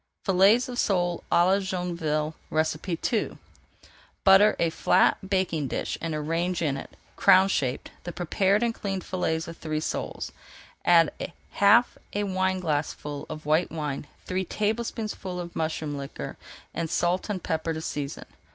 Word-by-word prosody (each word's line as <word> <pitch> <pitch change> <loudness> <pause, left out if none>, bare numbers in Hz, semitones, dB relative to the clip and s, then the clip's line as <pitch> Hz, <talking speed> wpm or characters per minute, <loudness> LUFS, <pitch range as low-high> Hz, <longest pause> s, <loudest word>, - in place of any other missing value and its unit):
FILLETS 200 +7 +5
OF 245 -1 -4
SOLE 175 -3 +1
À 175 - +5
LA 190 +2 +4
JOINVILLE 170 -5 -2 0.5
II 185 +5 -1 0.9
Butter 195 +2 +7
a 165 -1 +1
flat 185 +3 +2
baking 180 -7 0
dish - - -2
and 165 -2 -2
arrange 165 +3 -1
in 145 -3 +1
it, 135 - -9 0.2
crown 190 +1 +6
shaped, 135 -9 -1
the 175 - -5
prepared 190 +5 +1
and 235 -1 +1
cleaned 195 -4 -3
fillets 160 -3 -1
of 165 0 -8
three 155 -1 -2
soles. - - -4 0.5
Add 165 -3 +5 0.4
half 215 +4 +4
a 205 - 0
wineglassful 180 -7 -1
of 155 -1 -7
white 155 +4 +2
wine, 150 -3 -4 0.2
three 185 +1 -1
tablespoonfuls 215 -2 -2
of 175 -1 -7
mushroom 155 -2 -2
liquor, 140 -1 -6 0.4
and 165 -1 -2
salt 175 +4 0
and 190 -4 -3
pepper 160 -1 -1
to 160 0 -3
season. 145 -3 -4
175 Hz, 140 wpm, -27 LUFS, 160-195 Hz, 0.9 s, Butter